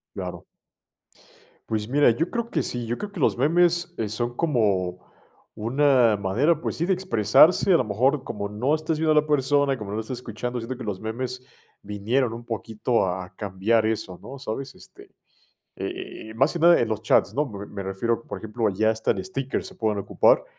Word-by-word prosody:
Claro. - - -6 1.3
Pues 110 -1 -1
mira, 145 +3 +4
yo 160 +9 0
creo 235 -1 -2
que - - 0
sí. 120 -1 -4
Yo 120 +1 -2
creo 205 - -6
que 200 - -8
los 135 - +2
memes, 175 +5 +2
eh, 110 -2 -2
son 120 +3 -3
como 100 - +1 0.5
una 125 -1 +3
manera, 120 - +1
pues - - -4
sí, 170 +3 -1
de 195 - +3
expresarse. 175 - +4
A 175 - +7
lo - - +1
mejor, 130 +6 +1
como 100 -1 -4
no 120 +8 0
estás 155 0 -1
viendo 155 0 +2
a 155 0 +5
la 150 - -11
persona 145 -1 +2
y - - -4
como 105 -3 -7
no 105 - -3
la - - -1
estás 120 +3 -6
escuchando, 120 +1 -5
siento 120 +3 -5
que - - -6
los 100 -3 -4
memes 125 +3 -5 0.4
vinieron 110 +5 0
un 120 +1 -8
poquito 115 0 -1
a 90 0 -4
cambiar 105 +3 +1
eso, 110 -5 -2
¿no? 135 +2 -10
¿Sabes? 135 +2 -5
Este, - - -16 0.7
eh - - -4
eh 110 - -8
eh - - -10
más 135 +6 +2
que 170 - -4
nada 170 +1 +7
en 120 - +2
los 110 -1 -3
chats, 110 - +3
¿no? 150 +2 +1
Me 100 -5 -8
me 100 -1 -7
refiero, 105 +5 -1
por - - -5
ejemplo, 110 +1 -1
ya 110 +3 +2
hasta 110 0 -1
en - - -1
stickers 135 -8 -3
se - - -11
pueden 110 -2 -1
ocupar. 100 - +3
120 Hz, 210 wpm, -25 LUFS, 105-145 Hz, 1.3 s, A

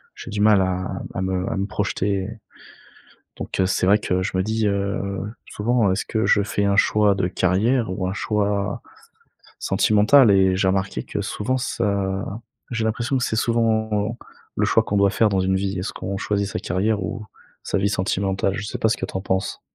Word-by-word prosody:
j'ai - - -9
du 105 - -3
mal 105 -2 +5
à 95 0 -2
à - - -2
me 95 0 -1
à - - -2
me 100 - 0
projeter. 100 -2 -1 1.1
Donc, - - -5
heu, - - +3
c'est 95 - 0
vrai 105 +2 +5
que 90 -2 -1
je 95 0 -2
me 95 - +1
dis, 110 0 0
heu, 100 +1 -1 0.5
souvent: 110 -1 +1
«Est-ce 95 - -1
que 110 0 -1
je 100 - +4
fais 100 0 -1
un 100 0 +2
choix 105 -1 +4
de 95 -2 0
carrière 100 +6 +1
ou 95 -1 -2
un 95 - -2
choix 100 -1 -1 0.8
sentimental?» 110 +3 +4
et 95 -1 +4
j'ai 95 -1 +2
remarqué 95 0 -1
que - - -4
souvent 130 +5 -2
ça 100 -6 -1 0.5
j'ai 115 -2 -1
l'impression 120 +4 0
que 125 - 0
c'est 110 - -1
souvent 110 -1 +1 0.4
le - - +2
choix - - +3
qu'on 100 - -2
doit 100 0 +4
faire 110 +2 +3
dans 95 - +1
une 95 0 +1
vie. 95 0 -2
Est-ce 90 - -3
qu'on 100 - -5
choisit 100 -1 -1
sa - - -3
carrière 100 +3 0
ou 105 +5 -5 0.4
sa - - -2
vie 100 +1 +1
sentimentale? 95 0 0
Je 100 - -4
sais - - -5
pas 110 - +2
ce 115 - +1
que - - -5
tu - - -12
en - - -1
penses. 95 -1 -2
100 Hz, 205 wpm, -22 LUFS, 95-110 Hz, 1.1 s, mal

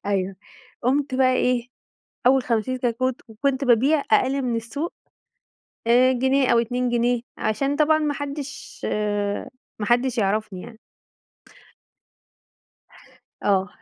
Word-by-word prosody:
أيوه، 195 -1 -1 0.5
قُمت 270 +2 +1
بقى 255 -1 +4
إيه، 250 -1 +1 0.6
أول 265 0 +5
50 240 +2 -1
كتكوت 250 +1 -1
وكنت 270 +5 -1
بابيع 270 +5 +4
أقل 270 +1 +3
من 240 -2 -1
السوق، 280 +9 -4 0.9
آآ، 250 +2 +5
جنيه 265 +1 +2
أو 235 - +5
2 245 +2 0
جنيه 240 0 +1 0.2
عشان 275 +7 0
طبعًا 310 0 +4
ما 300 -1 -1
حدش 285 0 -7
آآ، 205 -1 -2 0.3
ما 210 - -2
حدش 240 +1 +2
يعرفني 200 -2 -1
يعني. 225 -2 -12 2.6
آه. 195 -1 +2
250 Hz, 115 wpm, -23 LUFS, 220-270 Hz, 2.6 s, أول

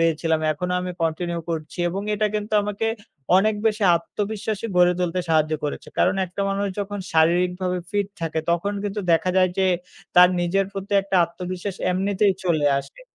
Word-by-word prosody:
হয়েছিলাম। 165 -1 +1
এখনও 180 +4 -3
আমি 180 0 -4
কন্টিনিউ 170 +1 -1
করছি 155 0 -5
এবং 190 +3 -3
এটা 210 +1 +1
কিন্তু 210 0 -3
আমাকে 210 +2 -2 0.5
অনেক 215 +3 +3
বেশি 215 -1 +1
আত্মবিশ্বাসী 205 +4 -4
গড়ে 180 0 +6
তুলতে 180 0 0
সাহায্য 155 -1 +2
করেছে। 145 - -4
কারণ 185 - +3
একটা 180 +3 -7
মানুষ 200 +1 -1
যখন 205 0 -3
শারীরিকভাবে 180 +3 +2
ফিট 205 -1 0
থাকে 160 -1 -1
তখন 175 +4 0
কিন্তু 205 +1 -2
দেখা 165 +3 +2
যায় 185 -1 +4
যে 190 - +3 0.5
তার 180 0 +8
নিজের 190 +3 +1
প্রতি 195 +1 -6
একটা 195 -1 -1
আত্মবিশ্বাস 180 +2 -6
এমনিতেই 195 +2 +2
চলে 160 -5 +2
আসে। 140 - -10
180 Hz, 165 wpm, -23 LUFS, 170-200 Hz, 0.5 s, তার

